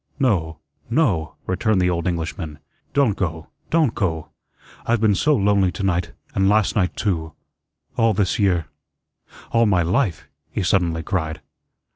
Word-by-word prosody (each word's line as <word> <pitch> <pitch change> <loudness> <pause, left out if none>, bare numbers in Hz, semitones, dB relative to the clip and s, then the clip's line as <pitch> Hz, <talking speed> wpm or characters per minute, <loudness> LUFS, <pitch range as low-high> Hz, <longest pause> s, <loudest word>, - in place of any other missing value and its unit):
"No 90 - +1 0.3
no," 115 - +1
returned 95 +2 +1
the 90 0 +2
old 85 0 -1
Englishman. 80 -2 -3 0.4
"Don't 135 -8 +3
go, 80 -4 -3 0.2
don't 155 -7 +3
go. 80 -6 -2 0.5
I've 115 0 +1
been 110 -1 +3
so 150 +9 +3
lonely 100 -4 +3
to 100 - -5
night 90 -2 0 0.2
and 95 0 +2
last 105 -1 +2
night 90 -4 +1
too 80 -6 -1 0.6
all 115 -2 +3
this 95 +1 +1
year 90 -5 +2 0.9
all 115 -1 +4
my 90 -4 +3
life," 95 - 0 0.2
he - - -2
suddenly 85 -3 +1
cried. 80 -5 -2
95 Hz, 145 wpm, -22 LUFS, 85-110 Hz, 0.9 s, all